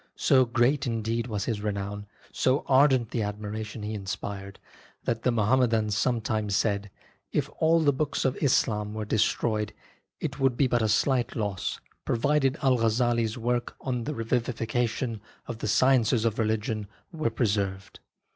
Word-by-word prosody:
So 130 -1 +4
great, 125 +3 +2
indeed, 115 0 -1
was 105 -4 -3
his 110 -3 -2
renown, 100 0 -4 0.3
so 130 +3 +1
ardent 130 -3 +4
the 115 - -1
admiration 105 +1 -5
he 105 +1 -3
inspired, 100 0 -5 0.5
that 115 -1 -1
the 125 - +2
Muhammedans 115 -2 +2
sometimes 110 -3 0
said: 100 -1 0 0.4
"If - - -1
all 165 +1 +4
the 145 -2 +3
books 145 +1 -1
of 130 0 +1
Islam 105 -7 +1
were 110 -1 -3
destroyed, 105 0 0 0.5
it - - -4
would 135 -3 +2
be 140 - +4
but 120 -2 +1
a 110 - +1
slight 125 +3 +1
loss, 105 -4 -2 0.2
provided 135 +3 +1
Al 130 -3 +3
Ghazzali' 115 +1 +2
s 110 +2 -4
work 120 0 -1
on 125 -3 -3
the 150 - -3
Revivification 115 0 -1 0.2
of 120 -2 -6
the - - -3
Sciences 120 -1 +3
of 115 -1 0
Religion 110 -1 -1 0.2
were 155 -7 -1
preserved." 100 -4 -2
115 Hz, 155 wpm, -27 LUFS, 105-125 Hz, 0.5 s, So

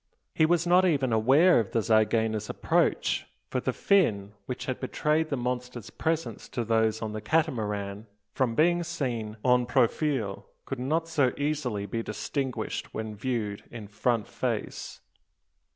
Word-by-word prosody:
He 155 - +3
was 170 0 +2
not 180 +2 +5
even 140 -9 +2
aware 135 +10 +5
of 110 -4 -3
the 115 - +2
zygaena's 110 -1 +2
approach; - - +1 0.2
for - - 0
the - - -1
fin, 110 - +2 0.2
which 125 - -4
had 130 - -3
betrayed 155 +4 0
the 140 - -1
monster's 125 -2 -4
presence 165 0 -2
to 120 - -3
those 110 0 +1
on 110 -1 -3
the 110 - -4
Catamaran, 110 -7 -1 0.3
from 125 -4 0
being 175 +4 +3
seen 125 -11 -3
en 125 -1 +4
profile, 120 -4 0 0.2
could 135 - -4
not 160 +6 0
so 145 -6 +2
easily 145 -8 -1
be 115 +3 -3
distinguished 125 +5 -4
when 110 -1 -4
viewed 105 -3 -2
in 115 -3 -8
"front 110 +1 0
face." - - -4
125 Hz, 150 wpm, -28 LUFS, 110-150 Hz, 0.3 s, not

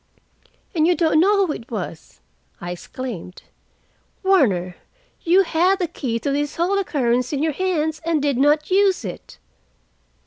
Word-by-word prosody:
"And 320 -2 +2
you 355 - +3
don't 320 -3 +2
know 400 +3 +4
who 310 - -2
it 230 - -10
was!" 180 -7 -7 0.4
I 175 - -6
exclaimed. 185 -1 -7 0.8
"Warner, 200 - +2 0.4
you 365 +3 +4
had 360 +3 +2
the 370 - -1
key 260 -8 -3
to 280 - -1
this 290 +1 -2
whole 370 +4 +1
occurrence 250 -9 0
in 290 0 -1
your 315 -1 0
hands, 315 -3 -1
and 330 -1 +1
did 280 -3 0
not 300 +4 +2
use 385 - +3
it!" 180 - -8
305 Hz, 150 wpm, -21 LUFS, 250-360 Hz, 0.8 s, know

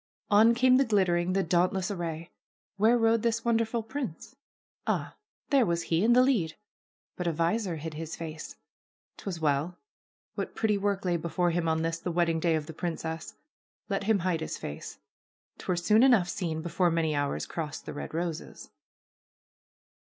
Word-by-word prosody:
On 220 +3 +6
came 255 +1 +5
the 270 - +5
glittering, 185 -6 +2
the 195 0 +2
dauntless 180 +2 +1
array. 170 -3 -4 0.5
Where 225 +4 +4
rode 225 -1 +3
this 230 0 0
wonderful 230 0 +1
prince? 255 - -6 0.5
Ah, - - -1 0.4
there 275 -3 +5
was 170 -4 0
he, 165 +3 +1
in 235 +2 +5
the 250 +1 +6
lead! 200 -13 +1 0.6
But 180 - -2
a - - +2
visor 170 +4 0
hid 160 +1 -6
his 160 +1 -5
face. 160 -2 -7 0.6
'Twas 185 -4 -5
well. 150 +3 0 0.6
What - - -5
pretty 220 -2 +1
work 200 -1 -1
lay 175 -1 +2
before 170 +2 0
him 170 0 0
on 160 0 +1
this, 165 0 -1
the 175 - -3
wedding 165 -1 +1
day 165 0 +2
of 155 -1 -2
the 160 - -8
princess! 165 -1 -4 0.5
Let 195 0 -1
him 220 0 +4
hide 170 -3 0
his 160 - -4
face. 75 - -7 0.6
'Twere 180 - -1
soon 210 +6 +4
enough 240 -9 +5
seen 160 -4 -3
before 175 +1 +1
many 165 -2 +1
hours 145 -1 -1
crossed 155 -3 -5
the - - -6
red 145 - -6
roses. 165 -1 -5
175 Hz, 170 wpm, -29 LUFS, 165-215 Hz, 0.6 s, On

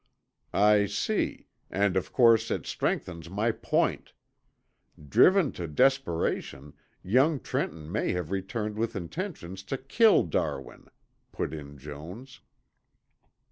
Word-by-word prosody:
"I 105 0 +5
see, 105 - -1 0.2
and 100 -1 +1
of 95 - -1
course 115 -3 +5
it - - -2
strengthens 85 -2 -3
my 105 +5 0
point. - - -1 0.9
Driven 180 - +5
to 85 - -6
desperation 80 - 0 0.3
young 135 - +3
Trenton 80 -8 -4
may - - 0
have 90 -2 -3
returned 105 +2 -3
with 115 +1 -2
intentions 95 - -5
to 135 - -3
kill 210 - +4
Darwin," 70 -5 -3 0.4
put 75 - -3
in 70 -2 -8
Jones. 85 - -10
100 Hz, 110 wpm, -28 LUFS, 85-125 Hz, 0.9 s, I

